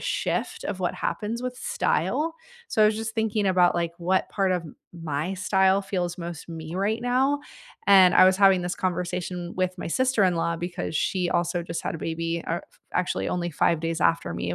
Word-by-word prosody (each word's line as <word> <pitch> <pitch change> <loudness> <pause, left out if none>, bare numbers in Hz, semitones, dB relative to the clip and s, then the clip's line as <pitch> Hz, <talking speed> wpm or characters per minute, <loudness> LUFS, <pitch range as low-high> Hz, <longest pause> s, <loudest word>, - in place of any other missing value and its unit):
shift - - -2
of - - -4
what - - -1
happens 230 +3 -3
with 250 0 -4
style, 320 +5 0 0.3
so 220 - +2
I - - +7
was 215 0 +1
just 225 0 -4
thinking 220 -2 0
about, 180 -2 +4
like, 170 -1 -1
what 185 +2 +1
part 195 -2 +1
of 180 -2 -1 0.3
my 165 +1 -3
style 190 +1 +2
feels 180 -3 -2
most 170 -2 -7
me 165 0 -7
right 205 +4 0
now, 265 +4 +2 0.5
and 190 -2 +7
I - - +8
was 185 0 +5
having 195 -2 +5
this 175 0 -2
conversation 180 -1 -3
with 185 0 -1
my - - -4
sister-in-law, 185 -8 +1
because 175 -2 -4
she 180 +3 0
also 175 0 0
just 170 0 -5
had - - -3
a - - -5
baby, 165 +1 -3
uh, 170 +1 -1
f - - -29
actually 180 0 0
only 175 -1 -2
5 165 +1 +1
days 165 0 -2
after 165 - +1
me. 90 0 -3
180 Hz, 195 wpm, -25 LUFS, 170-200 Hz, 0.5 s, I